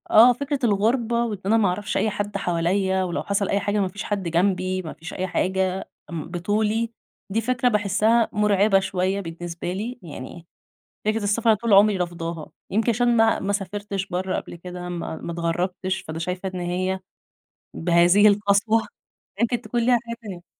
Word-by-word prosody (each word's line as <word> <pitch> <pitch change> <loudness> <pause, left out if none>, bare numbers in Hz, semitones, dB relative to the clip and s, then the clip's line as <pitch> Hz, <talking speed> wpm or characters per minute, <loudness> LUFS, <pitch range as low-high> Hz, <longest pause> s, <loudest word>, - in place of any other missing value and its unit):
اه 240 +3 +8
فكرة 280 +3 -3
الغُربة 235 +2 +2
وإن 210 -4 -4
أنا 220 +3 +4
ما 215 -3 +3
أعرفش 205 +3 -2
أي 220 - +2
حد 205 0 -3
حواليّا 190 +2 +1
ولو 175 -2 -2
حصل 200 0 0
أي 200 - +2
حاجة 205 +1 0
ما 195 - +1
فيش 205 +3 -6
حد 205 -2 -2
جنبي، 185 +2 +1
ما 160 - -7
فيش 165 - -9
أي 185 - -2
حاجة، 190 +1 -1 0.2
بطولي 210 +7 -1 0.4
دي 220 +4 0
فكرة 250 +2 +1
باحسّها 215 +2 +2
مرعبة 205 -1 +3
شويّة 190 +1 -1
بالنسبة 170 0 -5
لي، 230 +6 -5
يعني 165 0 -9 0.6
فكرة 215 +1 0
السفر 220 +2 +3
طول 220 +1 -1
عمري 200 +1 +6
رافضاها، 170 -3 -4 0.2
يمكن 220 +4 +2
عشان 240 +1 +2
ما 225 0 +4
ما 200 +1 -1
سافرتش 200 0 -3
برّه 185 +1 -2
قبل - - -6
كده، 180 +1 -7
ما 170 -2 -4
ما 170 - -6
اتغربتش 180 +3 -2
فأنا 160 +1 -7
شايفة 180 +3 -3
إن 180 - -3
هي 185 +2 -1 0.7
بهذه 175 +4 +5
القسوة 205 +2 +3 0.6
يمكن 235 0 +1
تكون 240 0 -2
ليها 245 0 +4
حاجة 235 0 -5
تانية. 185 -5 -8
195 Hz, 170 wpm, -24 LUFS, 180-215 Hz, 0.7 s, اه